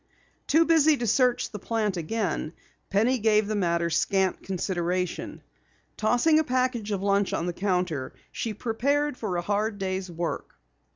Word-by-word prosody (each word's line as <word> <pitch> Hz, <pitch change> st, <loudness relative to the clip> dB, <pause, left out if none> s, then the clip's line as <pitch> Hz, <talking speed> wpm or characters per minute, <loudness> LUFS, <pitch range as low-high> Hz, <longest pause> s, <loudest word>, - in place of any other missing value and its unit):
Too 325 Hz, +2 st, +4 dB
busy 315 Hz, -2 st, +4 dB
to 240 Hz, -, -2 dB
search 245 Hz, +3 st, +2 dB
the 210 Hz, -, -6 dB
plant 215 Hz, -1 st, -1 dB
again, 175 Hz, -2 st, -2 dB, 0.4 s
Penny 230 Hz, +6 st, +2 dB
gave 215 Hz, -1 st, +3 dB
the 215 Hz, +1 st, -2 dB
matter 170 Hz, -3 st, 0 dB
scant 190 Hz, +3 st, +1 dB
consideration. 180 Hz, -1 st, -2 dB, 0.5 s
Tossing 245 Hz, +8 st, +3 dB
a -, -, +2 dB
package 255 Hz, -5 st, 0 dB
of 195 Hz, -1 st, -2 dB
lunch 200 Hz, 0 st, +2 dB
on 170 Hz, -, -1 dB
the 175 Hz, -, -2 dB
counter, 180 Hz, -7 st, -1 dB, 0.2 s
she 220 Hz, -2 st, -4 dB
prepared 280 Hz, +6 st, 0 dB
for 200 Hz, -7 st, -3 dB
a 175 Hz, -, -2 dB
hard 205 Hz, +2 st, -1 dB
day's 190 Hz, -1 st, -3 dB
work. 170 Hz, 0 st, -4 dB
205 Hz, 155 wpm, -26 LUFS, 180-240 Hz, 0.5 s, Too